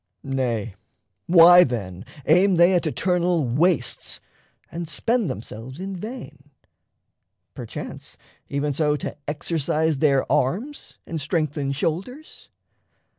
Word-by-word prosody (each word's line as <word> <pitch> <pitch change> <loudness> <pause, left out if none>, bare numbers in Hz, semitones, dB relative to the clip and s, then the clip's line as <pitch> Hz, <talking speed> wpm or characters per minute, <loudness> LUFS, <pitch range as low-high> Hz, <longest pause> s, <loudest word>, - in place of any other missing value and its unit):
Nay, 120 -6 -2 0.5
why, 175 +1 +8
then, 100 - -4 0.2
aim 180 +4 +4
they 175 +2 +5
at 175 -2 +1
eternal 175 -1 0
wastes, 155 +7 0 0.5
And 170 -1 -5
spend 225 - 0
themselves 125 +3 -7
in 195 +1 -5
vain? 175 - -9 1.0
perchance, - - -8 0.3
even 140 +1 -1
so 150 +1 +1
To 145 - -5
exercise 155 0 -1
their 140 -3 +3
arms 220 - -1
and 160 -2 -5
strengthen 145 -3 -1
shoulders? 190 - -4
155 Hz, 105 wpm, -23 LUFS, 135-180 Hz, 1.0 s, why